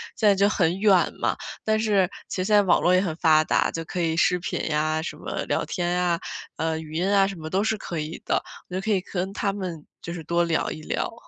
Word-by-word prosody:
在 210 -3 +4
就 200 +1 +3
很 180 -1 +1
远 200 -4 +4
嘛， - - +1 0.3
但 220 0 +2
是， 200 -4 +2 0.2
其 - - -4
实 185 - -1
现 210 0 +3
在 205 - +7
网 185 - +3
络 180 - +4
也 185 - +4
很 180 -5 -1
发 155 -2 +5
达， - - +2
就 165 - -4
可 180 - -5
以 165 -1 +1
视 180 +1 +3
频 180 0 -3
呀， 155 +1 +1
什 160 - -5
么 - - -4
聊 - - -1
天 175 -1 -2
呀、 180 -1 +1 0.4
呃， 160 0 -1
语 155 -1 -9
音 175 +4 0
啊 195 -1 +5
什 195 - -5
么 160 -1 -7
都 190 +3 +1
是 220 0 0
可 170 -5 -5
以 155 +2 -5
的， - - +1 0.3
就 185 - -2
可 220 - -4
以 195 - +2
跟 185 +1 -3
他 200 - 0
们 180 -6 -5 0.2
就 170 - -6
是 165 -2 -6
多 170 +2 +1
聊 165 -1 0
一 155 - -7
聊。 - - -2
180 Hz, 270 characters per minute, -25 LUFS, 160-195 Hz, 0.4 s, 在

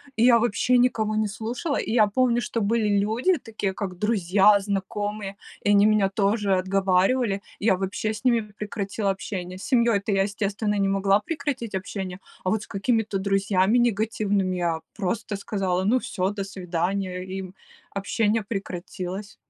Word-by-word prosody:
И 225 - +2
я 240 -1 +7
вообще 240 +2 +2
никого 220 -3 +1
не 215 0 +1
слушала. 230 +8 -3
И - - -2
я 220 -2 +5
помню, 240 +2 +2
что 230 - -2
были 210 -1 +2
люди 230 - +2
такие, 215 -5 -4
как 185 -2 -5
друзья, 205 -1 +4
знакомые, 200 0 -3 0.3
и - - 0
они 205 0 +6
меня 210 -2 +3
тоже 200 0 +1
отговаривали. 195 +3 +1 0.2
Я 200 -2 +3
вообще 195 +3 -2
с 215 -1 -7
ними 240 -3 +3 0.2
прекратила 205 -1 -2
общение. 185 -1 -5
С - - -9
семьей 235 -5 +3
то 200 +2 -3
я, 195 -1 +3
естественно, 205 +1 -1
не 195 - +2
могла 195 +1 +3
прекратить 275 -4 -4
общение. 190 -1 -5 0.2
А 185 - 0
вот 215 +1 0
с - - -13
какими-то 210 0 0
друзьями 195 +2 +2
негативными- 210 -4 +1
я 170 -2 0 0.2
просто 205 +2 -2
сказала: 190 -4 -1
"Ну 235 +6 +3
всё, 185 -5 -2
до 205 -1 -4
свидания". 195 - -10 0.7
И, 190 +1 -5
м, 185 -1 -9 0.4
общение 210 +2 0
прекратилось. 195 0 -5
205 Hz, 165 wpm, -25 LUFS, 195-225 Hz, 0.7 s, я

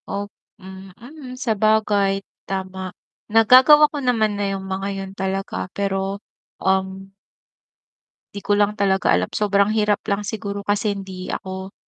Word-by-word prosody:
Op 205 +1 -4 0.2
mm, 220 - -11
sabagay, 215 -4 +1 0.2
tama. 190 -1 -4 0.4
Nagagawa 255 +7 +7
ko - - -3
naman 225 -5 +1
na 200 -1 -1
'yung 195 -1 -5
mga 190 +1 -3
'yun 195 0 -6
talaga 195 -1 -3
pero, 195 0 -1 0.4
um 190 0 -1 1.2
'di 200 - -5
ko 205 +1 0
lang 205 0 +1
talaga 195 - +2
alam, 90 +2 +2
sobrang 200 -1 +1
hirap 210 -1 +2
lang 205 0 -1
siguro 205 -1 -5
kasi 205 0 0
hindi 190 -2 -7
ako 190 0 -6
200 Hz, 130 wpm, -21 LUFS, 190-210 Hz, 1.2 s, Nagagawa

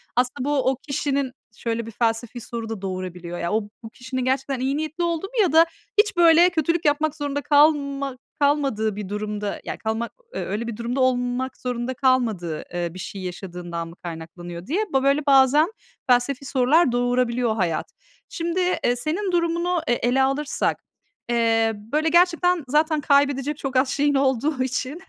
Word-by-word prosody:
Aslında 255 +2 0
bu, 275 -3 +2
o - - -2
kişinin 275 0 -2 0.3
şöyle 230 -1 -2
bir 230 - -8
felsefi 230 +1 -1
soru 230 -1 -6
da 220 -4 -5
doğurabiliyor. 180 -2 -5
Ya, 170 +2 -2
o 220 - +2 0.2
bu 225 - -7
kişinin 255 +2 -5
gerçekten 265 0 0
iyi 270 +2 0
niyetli 315 +3 -3
olduğu 340 +1 -1
mu 475 +1 0
ya 365 -7 +3
da 325 +1 +7 0.3
hiç, 415 -3 +3
böyle, 340 +1 +7
kötülük 335 0 0
yapmak 305 +1 +2
zorunda 285 -1 -3
kalma 280 -2 +2 0.2
kalmadığı 275 -8 +1
bir 205 -2 -6
durumda, 210 0 -4
ya - - -5
kalmak, 225 +1 -3 0.2
eee, - - -3
öyle 215 +4 -3
bir 230 - -5
durumda 235 +3 -3
olmak 250 0 0
zorunda 250 0 -3
kalmadığı, 230 - 0
eee, 175 -1 -2
bir 185 - -9
şey 195 +2 -6
yaşadığından 175 -2 -6
mı 165 - -12
kaynaklanıyor, 170 +1 -8
diye 390 +9 0
ba 270 - +2
böyle, 280 +2 +2
bazen 280 +5 +5 0.4
felsefi 255 +2 +2
sorular 270 +3 +3
doğurabiliyor 245 -1 +1
hayat. 175 -7 -1 0.4
Şimdi, 340 +1 -2 0.2
eee, 245 - +2
senin 335 +10 -2
durumunu, 340 0 +1
eee, 240 - +3
ele 250 +3 +2
alırsak, 275 +2 -1 0.5
eee, 225 -1 +2
böyle, 290 +10 -1
gerçekten 355 0 +3
zaten 305 +3 +2
kaybedecek 280 0 +2
çok 270 -2 -5
az 260 +1 +3
şeyin 290 +1 +1
olduğu 270 +1 +1
için 260 +5 -3
260 Hz, 165 wpm, -23 LUFS, 225-295 Hz, 0.5 s, da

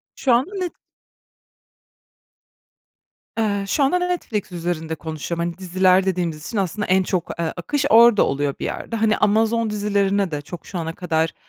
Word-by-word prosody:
Şu 260 - +2
anda 255 +10 +2
Net 365 -3 -3 2.6
eee, 205 -3 0
şu 275 +9 +1
anda 275 +7 +3
Netflix 355 - -2
üzerinde 165 -2 -3
konuşuyorum. 160 +1 -4
Hani, 170 0 -4
diziler 185 0 +3
dediğimiz 170 -5 -2
için 230 - -4
aslında 200 +2 -1
en 190 +1 +3
çok, 180 -2 -2
eee, 165 -1 -1
akış 285 - -2
orada 230 -1 +7
oluyor 140 0 -1
bir - - -3
yerde. - - -4
Hani, 220 -1 +2
Amazon 220 +2 +2
dizilerine 200 -2 0
de 150 -1 -3
çok 160 +4 -10
şu 190 - -6
ana 165 -1 -4
kadar 160 -2 0
190 Hz, 155 wpm, -21 LUFS, 170-220 Hz, 2.6 s, orada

